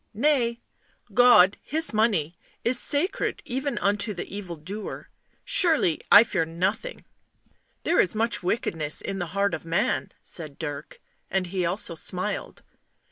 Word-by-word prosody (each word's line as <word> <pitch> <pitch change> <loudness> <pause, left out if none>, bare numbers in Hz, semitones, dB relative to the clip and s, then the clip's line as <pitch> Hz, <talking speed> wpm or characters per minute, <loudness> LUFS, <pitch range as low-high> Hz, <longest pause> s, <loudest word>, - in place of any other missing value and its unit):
"Nay; 240 -2 +1 0.5
God 240 -6 +6
His 315 -3 +2
money 200 -8 +1 0.3
is 240 +1 +5
sacred 295 +10 +1
even 270 +3 -3
unto 205 +1 0
the 175 - -5
evildoer. 190 +1 -7 0.4
Surely 340 - +2
I 205 +2 +10
fear 190 -7 -1
nothing." 175 - -3 0.4
" - - -41
There 345 - +2
is 185 - +3
much 220 -1 0
wickedness 165 -5 -1
in 195 - -4
the 175 - -3
heart 200 0 +1
of - - -4
man," 165 +5 -1
said 155 -5 -5
Dirk. 145 -3 -6 0.3
And 190 0 0
he 180 -1 -2
also 180 0 -1
smiled. 185 +5 -4
200 Hz, 135 wpm, -25 LUFS, 175-240 Hz, 0.5 s, I